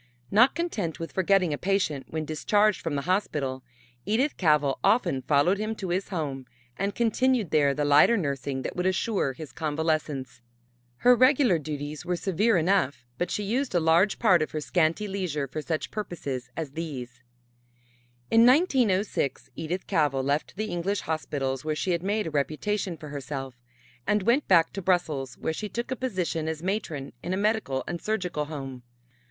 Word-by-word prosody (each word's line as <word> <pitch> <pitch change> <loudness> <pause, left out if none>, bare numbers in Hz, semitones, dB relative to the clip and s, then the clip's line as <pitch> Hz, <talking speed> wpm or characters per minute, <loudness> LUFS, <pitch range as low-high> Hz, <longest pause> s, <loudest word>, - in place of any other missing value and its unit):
Not 240 +6 +5
content 220 - -2
with 165 - -5
forgetting 190 -3 +2
a 145 - -4
patient 185 -8 0
when 155 -1 -3
discharged 205 +6 +2
from 160 -3 -2
the 140 - -2
hospital, 145 -9 -1 0.4
Edith 250 +8 +1
Cavell 150 -5 +2
often 175 - +2
followed 155 +9 +2
him 215 +1 -2
to 190 -4 -5
his 185 +3 -1
home 140 -8 -4 0.3
and 200 +1 -2
continued 240 -2 +1
there 140 -2 +3
the 145 - 0
lighter 145 +11 +6
nursing 140 -5 -2
that - - -4
would 180 +1 0
assure 190 -6 0
his 150 -1 -9
convalescence. 150 -5 -2 0.6
Her 250 - +9
regular 255 - +4
duties 150 -1 -5
were 180 - -1
severe 195 +4 +2
enough 155 -9 +1
but 175 - 0
she 210 - -2
used 240 +2 -1
a - - +5
large 165 +5 +3
part 185 -7 +4
of 155 - -1
her 155 - -1
scanty 165 +5 +1
leisure 180 -8 -2
for 155 +4 -5
such 155 0 -3
purposes 145 - -5
as 160 -4 -4
these. 130 -6 -6 1.1
In 225 0 +6
1906 220 - +2
Edith 170 +4 -4
Cavell 145 -7 +1
left 140 +3 -1
the 215 +2 -3
English 185 +4 -1
hospitals, 140 -4 -2
where 155 0 -1
she 185 - -1
had 170 -1 0
made 205 +3 0
a 160 - -4
reputation 165 +6 -1
for 150 - -9
herself, 135 -2 -5 0.5
and 210 -1 +2
went 240 +7 +2
back 165 -3 +4
to 195 - -4
Brussels, 155 -9 0
where 160 - -2
she 210 +6 -5
took 235 +4 -4
a - - 0
position 185 -11 -2
as 160 0 -4
matron 170 -8 -3
in 180 +2 -2
a - - -2
Medical 205 -10 0
and 170 - -4
Surgical 180 -8 -2
Home. 135 -4 -7
170 Hz, 175 wpm, -27 LUFS, 145-205 Hz, 1.1 s, Her